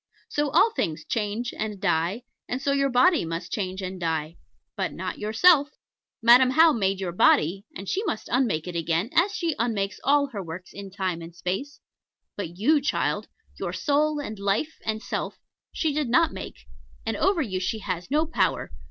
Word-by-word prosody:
So 295 0 0
all 355 +10 +4
things 155 - -2
change 225 +2 -2
and 210 -2 -4
die, 180 +4 0 0.3
and 250 - -2
so 280 +1 0
your 275 0 +2
body 310 +8 +4
too - - -4
must 165 +1 -5
change 190 -1 -3
and 185 0 -5
die 160 -1 -2 0.4
but - - -2
not - - -5
yourself. 285 +8 +4 0.5
Madam 245 +2 +7
How 320 +4 +6
made 195 -4 0
your 185 -3 -2
body; 180 +3 +3
and 195 - -7
she 395 - -1
must 220 - -3
unmake 230 -11 +1
it 175 - -5
again, 170 +6 0
as 395 +5 +3
she 335 -5 0
unmakes 205 -4 -1
all 285 +1 +4
her 205 -5 -4
works 180 +1 -8
in 200 0 -8
Time 185 -3 -3
and 165 0 -10
Space; 190 +12 -4 0.5
but 175 -4 -6
you, 290 +9 +3
child, 280 - -1 0.3
your - - -3
Soul, 300 0 +1
and 215 -8 -6
Life, 200 +11 -1
and 220 0 -2
Self, - - -4 0.3
she 315 -3 -1
did 295 -4 -1
not 320 +6 +3
make; - - -8 0.4
and - - -1
over 385 -5 +2
you 190 -6 -3
she 185 +4 -1
has 185 -3 -4
no 305 +3 +2
power. 325 - 0
215 Hz, 185 wpm, -25 LUFS, 185-285 Hz, 0.5 s, Madam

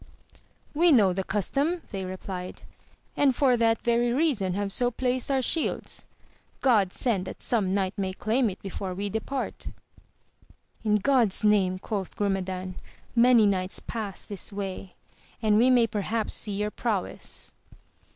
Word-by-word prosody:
We 335 +3 +4
know 205 -9 +5
the 190 +1 -2
custom 285 - -1
they 195 -3 -4
replied, 185 0 -6 0.5
and 275 -3 +3
for 260 -2 +4
that 225 -1 +2
very 240 0 +2
reason 240 - +1
have 200 0 -2
so 245 +3 +2
placed 250 +1 -1
our 265 -2 +1
shields; 320 +5 -2 0.5
God 215 -8 +3
send 205 -6 0
that - - -8
some 210 -6 +1
knight 190 -1 0
may 190 -1 -1
claim 225 +5 +1
it 190 - -8
before 190 -1 -5
we 200 +2 -3
depart! 240 +6 -4 1.2
In 210 -1 +3
God's 225 -2 +2
name, 195 -3 +3
quoth 195 -1 -4
Grumedan, 185 -2 -2 0.4
many 235 -2 +6
knights 185 -2 0
pass 210 -4 -5
this 205 0 -5
way, 195 -2 -6 0.4
and 215 -1 +3
we 250 +3 +5
may 245 -2 +5
perhaps 215 +1 -2
see 210 - -2
your 210 +1 -1
prowess. 210 -6 -3
210 Hz, 145 wpm, -27 LUFS, 190-245 Hz, 1.2 s, many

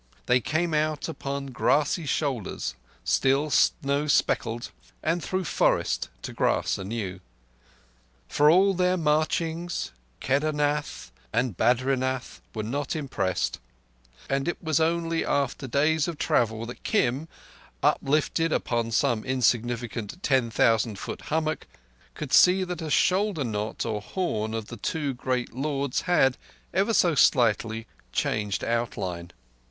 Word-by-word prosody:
They 125 0 +3
came 160 +5 0
out 155 0 0
upon 140 -4 -4
grassy 145 +5 +1
shoulders 130 - -2 0.3
still 140 +3 +2
snow 140 +5 +2
speckled, 120 -4 +1 0.3
and 165 +1 0
through 185 0 -1
forest, - - +1
to - - -6
grass - - +1
anew. 95 -2 -4 1.1
For 150 - +4
all 190 +4 +5
their 180 0 +2
marchings, 165 +2 0 0.3
Kedarnath 145 - -1 0.2
and 115 -2 0
Badrinath 130 +3 0
were 110 - -2
not 135 +7 -2
impressed; 130 - -1 0.7
and 135 +2 -1
it 175 - -2
was 160 -3 0
only 165 0 +1
after 140 -1 -1
days 150 +4 +2
of 170 -3 -4
travel 115 -4 +1
that 120 - -9
Kim, 145 - 0 0.6
uplifted 155 +3 +2
upon 120 -5 0
some 115 0 +1
insignificant 120 - -1
ten 130 -4 +2
thousand 110 -1 +2
foot - - -6
hummock, 155 0 -1 0.5
could 140 -4 -6
see 185 +8 +6
that 180 -1 -4
a 160 - -4
shoulder 190 0 +2
knot 105 -2 -3
or 110 -2 -2
horn 110 - -2
of 110 -1 -3
the 120 - -7
two 145 +4 -2
great 125 0 -2
lords 140 0 -1
had—ever 175 - +1
so 175 -6 +4
slightly—changed 110 - +1
outline. 95 -7 -2
135 Hz, 120 wpm, -26 LUFS, 115-160 Hz, 1.1 s, see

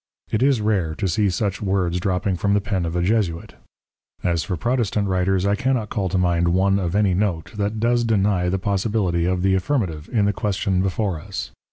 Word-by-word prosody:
_ - - -19
It 110 - +1
is 135 -4 +3
rare 95 -7 0
to 100 - -1
see 100 +3 +1
such 95 0 -2
Words 95 -3 0
dropping 95 +1 0
from 100 +3 +1
the - - +3
Pen 95 -3 -2
of 85 - -4
a 90 - +1
Jesuit: 90 -5 0 0.7
As 85 -2 +1
for 90 -4 -3
Protestant 110 -2 0
Writers, 95 0 +1
I 100 - +2
cannot 120 -1 0
call 100 -4 -1
to 95 - 0
mind 85 -1 +2
one 95 +3 +2
of 90 -1 -2
any 100 -3 +3
Note, 90 -4 -1
that 105 +1 -1
does 120 +1 +2
deny 100 -5 +1
the 95 - 0
Possibility 95 -3 0
of 90 0 0
the 95 0 +3
Affirmative, 95 - -1
in 110 -5 +2
the 100 - +1
Question 95 -2 0
before 95 -2 -1
us. - - -6
95 Hz, 210 wpm, -22 LUFS, 90-105 Hz, 0.7 s, is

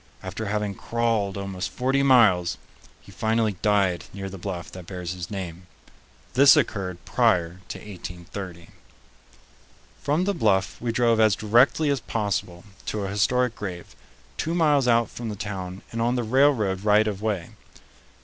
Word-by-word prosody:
After 110 - -5
having 105 0 -1
crawled 115 -3 -1
almost 95 -1 -4
forty 135 +2 0
miles, 110 -10 +4 0.4
he - - -15
finally 110 -2 0
died 95 -4 +2
near 95 -1 -5
the 95 - -8
bluff 90 -2 -5
that 90 -2 -10
bears 90 -2 -5
his 90 -1 -7
name. 90 -3 -6 0.7
This 140 +4 +7
occurred 95 - -1
prior 85 0 +1
to - - -6
1830. 90 -2 -8 1.3
From 150 +5 +1
the 200 +2 +1
bluff 100 - +1
we 120 -1 -1
drove 115 -1 +2
as 110 -3 +5
directly 125 +9 +3
as 140 - 0
possible 100 -6 -3 0.2
to 105 -2 -2
a - - -3
historic 120 +4 +1
grave, 90 -4 -7 0.4
two 165 +2 -1
miles 150 -6 +3
out 115 -1 +4
from 120 -2 -6
the 105 - -4
town 95 -2 -6
and 115 - -3
on 120 +2 +1
the 120 - 0
railroad 110 -6 +2
right 105 +1 +4
of 100 -2 -3
way. 105 -6 -2
105 Hz, 155 wpm, -25 LUFS, 95-120 Hz, 1.3 s, This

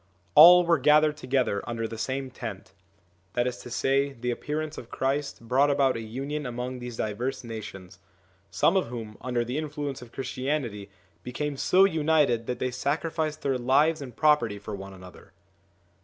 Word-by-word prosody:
all 175 +3 +9
were 170 -2 +3
gathered 150 +2 +4
together 130 -8 0
under 115 -1 -2
the 115 - -7
same 130 +3 -3
tent; 100 -6 -8 0.6
that 120 - +1
is 125 -1 -2
to 125 - -10
say, 135 +3 +1
the 125 -1 -3
appearance 150 +5 -4
of 115 - -12
Christ 135 -3 -2
brought 135 +4 +3
about 140 -2 +2
a 115 - -4
union 135 +6 -4
among 125 +1 -5
these 120 -2 -7
diverse 115 +6 -3
nations; 105 -5 -9 0.5
some - - +2
of - - +2
whom, 115 -3 -7
under 120 -2 -1
the 125 +5 -2
influence 145 -3 -5
of 120 -2 -12
Christianity, 130 -5 -3 0.3
became 140 +6 -4
so 185 +7 +4
united 150 -9 +2
that 125 - -2
they 130 +1 -2
sacrificed 155 +4 -2
their 135 -2 0
lives 145 +6 +3
and 125 -4 -8
property 150 -9 +3
for 105 +1 -8
one 95 -1 -8
another. 90 -2 -14
130 Hz, 170 wpm, -27 LUFS, 115-150 Hz, 0.6 s, all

